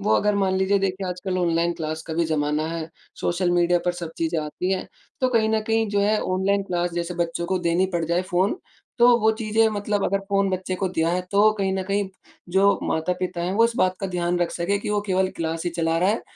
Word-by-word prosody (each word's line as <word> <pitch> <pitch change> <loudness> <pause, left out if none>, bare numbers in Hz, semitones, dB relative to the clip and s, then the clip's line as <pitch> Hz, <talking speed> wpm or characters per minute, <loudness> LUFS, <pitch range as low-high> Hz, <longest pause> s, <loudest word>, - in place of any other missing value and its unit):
वो 205 - +2
अगर 210 0 +2
मान 190 -2 +1
लीजिए 190 +1 +2
देखिए 190 0 -2
आजकल 180 +1 -3
ऑनलाइन 170 -1 +1
क्लास 155 0 -4
का 160 - -4
भी 170 0 +1
ज़माना 155 0 0
है, 165 -1 -4 0.3
सोशल 175 +1 0
मीडिया 175 0 +3
पर 180 - +1
सब 170 -2 -6
चीज़ें 165 0 0
आती 180 +5 -2
हैं। 190 - -2 0.3
तो 255 - +3
कहीं 220 -1 +3
न 220 0 +2
कहीं 225 -1 +1
जो 205 - +1
है 210 +1 +2
ऑनलाइन 195 +2 +1
क्लास 175 -2 -1
जैसे 175 0 -3
बच्चों 170 0 -2
को 185 0 0
देनी 175 +2 +1
पड़ 170 -1 0
जाए 170 +3 0
फ़ोन, 190 - 0 0.4
तो 240 0 +7
वो 220 +1 +4
चीज़ें 220 0 +2
मतलब 205 -1 -1
अगर 195 +1 +1
फ़ोन 195 -1 +2
बच्चे 185 0 -2
को 190 +1 -1
दिया 165 -2 0
है, 180 - +1
तो 210 +2 +5
कहीं 190 -1 0
न 190 - -1
कहीं 200 -1 0 0.4
जो 195 +1 +4
माता-पिता 180 +2 -1
हैं 180 +2 -1
वो 230 +2 +5
इस 230 - +2
बात 185 0 +2
का 195 - -1
ध्यान 175 -1 -1
रख 175 -1 0
सकें 195 +4 -1
कि - - -4
वो 210 - +1
केवल 190 0 +2
क्लास 165 +1 -3
ही 175 - 0
चला 165 -1 0
रहा 185 +3 +2
है, 220 - 0
185 Hz, 240 wpm, -24 LUFS, 170-200 Hz, 0.4 s, तो